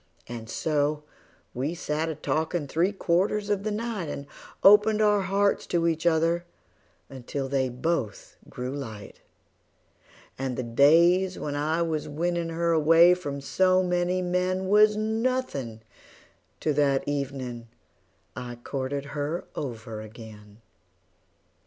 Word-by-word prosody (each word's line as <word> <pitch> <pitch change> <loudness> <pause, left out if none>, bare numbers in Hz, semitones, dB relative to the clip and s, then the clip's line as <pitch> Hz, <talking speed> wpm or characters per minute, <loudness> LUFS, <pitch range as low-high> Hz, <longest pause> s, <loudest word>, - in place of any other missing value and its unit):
And 115 -2 -8
so 150 +1 0 0.5
we 140 +7 -2
sat 160 -1 -2
a 160 - -3
talkin' 155 +1 -2
three 170 +7 +1
quarters 200 +2 0
of 200 -2 +1
the 215 - -2
night, 210 -5 -3
And 140 -1 -5 0.4
opened 210 +2 +6
our 210 -1 +3
hearts 200 +2 +1
to 170 -1 0
each 165 +1 0
other 165 +1 +2 0.6
until 135 +1 -5
they 135 -1 0
both 125 -3 -3
grew 125 +1 -5
light; 110 -7 -8 1.2
And 130 -2 -3
the 130 - -2
days 170 +10 +4
when 145 -1 -4
I 155 +3 0
was 160 -3 -2
winnin' 170 +2 -1
her 170 +1 0
away 165 +2 +6
from 145 -6 -5
so 185 +7 +2
many 180 0 0
men 185 +1 -1
Was 210 +1 +5
nothin' 220 - -2 0.8
to 155 - +1
that 140 -2 +1
evenin' 130 -4 -4 0.7
I 120 -1 -6
courted 135 +3 -4
her 150 +4 -3
over 115 -5 -6
again. 110 -1 -12
160 Hz, 125 wpm, -26 LUFS, 135-180 Hz, 1.2 s, opened